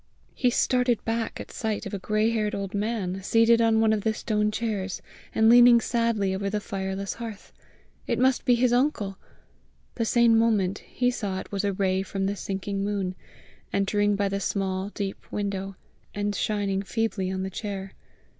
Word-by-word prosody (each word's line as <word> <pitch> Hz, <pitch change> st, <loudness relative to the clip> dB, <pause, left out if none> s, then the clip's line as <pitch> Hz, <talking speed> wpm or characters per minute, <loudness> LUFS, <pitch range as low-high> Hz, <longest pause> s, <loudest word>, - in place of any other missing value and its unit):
He 250 Hz, -, +2 dB
started 245 Hz, -1 st, +1 dB
back 225 Hz, 0 st, -2 dB
at -, -, -8 dB
sight 220 Hz, -2 st, -3 dB
of -, -, -6 dB
a 200 Hz, -, -2 dB
gray 215 Hz, +3 st, +1 dB
haired 215 Hz, -2 st, 0 dB
old 200 Hz, -1 st, -4 dB
man, 200 Hz, -3 st, -2 dB
seated 230 Hz, +3 st, +4 dB
on 225 Hz, -1 st, +4 dB
one 220 Hz, -1 st, +4 dB
of 215 Hz, -, 0 dB
the 220 Hz, +1 st, 0 dB
stone 210 Hz, -1 st, 0 dB
chairs, 210 Hz, -3 st, -3 dB, 0.4 s
and 220 Hz, 0 st, +4 dB
leaning 240 Hz, 0 st, +8 dB
sadly 230 Hz, -4 st, 0 dB
over 200 Hz, +1 st, -2 dB
the 210 Hz, +1 st, -1 dB
fireless 195 Hz, -1 st, -4 dB
hearth: 225 Hz, -4 st, -8 dB, 0.5 s
it -, -, 0 dB
must 260 Hz, 0 st, +2 dB
be 245 Hz, -, +4 dB
his 240 Hz, 0 st, +2 dB
uncle! 245 Hz, -7 st, 0 dB, 0.7 s
The 230 Hz, -, -1 dB
same 235 Hz, 0 st, +4 dB
moment 205 Hz, -4 st, +2 dB
he 250 Hz, 0 st, -1 dB
saw 200 Hz, -6 st, -3 dB
it -, -, -9 dB
was 200 Hz, 0 st, -2 dB
a 200 Hz, -1 st, 0 dB
ray 190 Hz, 0 st, +1 dB
from 195 Hz, 0 st, -3 dB
the 200 Hz, +1 st, -1 dB
sinking 195 Hz, 0 st, -3 dB
moon, 200 Hz, -2 st, -1 dB, 0.6 s
entering 205 Hz, +1 st, +1 dB
by 200 Hz, 0 st, +1 dB
the 195 Hz, 0 st, -2 dB
small, 190 Hz, 0 st, -2 dB
deep 200 Hz, -2 st, -6 dB
window, 195 Hz, -1 st, -3 dB, 0.4 s
and 205 Hz, 0 st, -1 dB
shining 200 Hz, -2 st, -1 dB
feebly 200 Hz, -2 st, -2 dB
on 190 Hz, 0 st, -2 dB
the 190 Hz, -, -4 dB
chair. 195 Hz, -1 st, -5 dB
205 Hz, 180 wpm, -26 LUFS, 195-225 Hz, 0.7 s, leaning